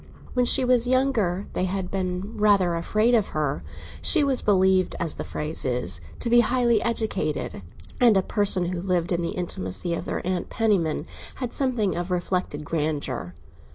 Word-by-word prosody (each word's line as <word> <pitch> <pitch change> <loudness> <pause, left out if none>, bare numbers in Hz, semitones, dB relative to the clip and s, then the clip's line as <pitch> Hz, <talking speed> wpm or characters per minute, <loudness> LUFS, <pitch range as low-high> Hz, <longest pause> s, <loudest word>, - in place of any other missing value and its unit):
When 250 -1 +2
she 260 +1 +4
was 245 -1 +3
younger 240 -8 +1
they 185 - 0
had 185 0 -3
been 185 +2 -3
rather 200 -4 +3
afraid 215 +8 +1
of 220 -4 +3
her; 145 -2 -1 0.4
she 320 -4 +4
was 275 -3 +2
believed, 190 -2 +2
as 165 -3 -2
the - - -6
phrase 150 +1 -4
is, 120 -9 -1 0.2
to - - -2
be 240 +1 +5
highly 240 -1 +3
educated, 215 - -2 0.4
and 235 -5 +5
a 190 - +2
person 200 -3 +3
who 175 - -3
lived 180 -2 -1
in 175 -1 0
the 170 - -2
intimacy 170 - -2
of 170 - -4
their - - -4
Aunt 185 -1 -2
Penniman 195 -9 0 0.3
had 250 -3 -5
something 245 -8 0
of 175 +1 -3
reflected 180 -4 -2
grandeur. 145 - -3
185 Hz, 170 wpm, -24 LUFS, 170-230 Hz, 0.4 s, be